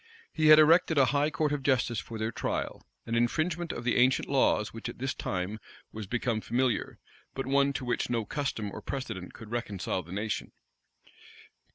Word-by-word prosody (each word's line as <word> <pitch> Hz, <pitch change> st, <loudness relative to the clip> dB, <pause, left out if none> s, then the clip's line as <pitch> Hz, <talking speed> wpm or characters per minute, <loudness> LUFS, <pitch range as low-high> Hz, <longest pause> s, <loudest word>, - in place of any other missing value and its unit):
He 155 Hz, -1 st, +2 dB
had 155 Hz, 0 st, +10 dB
erected 160 Hz, +1 st, +5 dB
a 135 Hz, -, +6 dB
high 145 Hz, +1 st, +2 dB
court 155 Hz, -1 st, 0 dB
of 145 Hz, -1 st, -1 dB
justice 125 Hz, -4 st, +1 dB
for 115 Hz, -, -7 dB
their 110 Hz, +1 st, -2 dB
trial; -, -, -3 dB, 0.2 s
an 115 Hz, -, -4 dB
infringement 155 Hz, +9 st, 0 dB
of 115 Hz, -, -6 dB
the 120 Hz, -, +1 dB
ancient 125 Hz, +1 st, +3 dB
laws 130 Hz, -6 st, +2 dB
which 115 Hz, +1 st, -6 dB
at -, -, -8 dB
this 135 Hz, +2 st, -2 dB
time 95 Hz, +2 st, -3 dB, 0.3 s
was 110 Hz, -2 st, -7 dB
become 115 Hz, 0 st, -1 dB
familiar, 120 Hz, 0 st, 0 dB, 0.4 s
but 135 Hz, -, -3 dB
one 140 Hz, +1 st, +3 dB
to 130 Hz, -, -4 dB
which 120 Hz, -, -1 dB
no 115 Hz, -3 st, 0 dB
custom 110 Hz, -6 st, -3 dB
or -, -, -7 dB
precedent 115 Hz, -10 st, -5 dB
could 110 Hz, -1 st, -11 dB
reconcile 105 Hz, -6 st, -2 dB
the 85 Hz, 0 st, -14 dB
nation. 105 Hz, +3 st, -3 dB
120 Hz, 185 wpm, -29 LUFS, 110-140 Hz, 0.4 s, had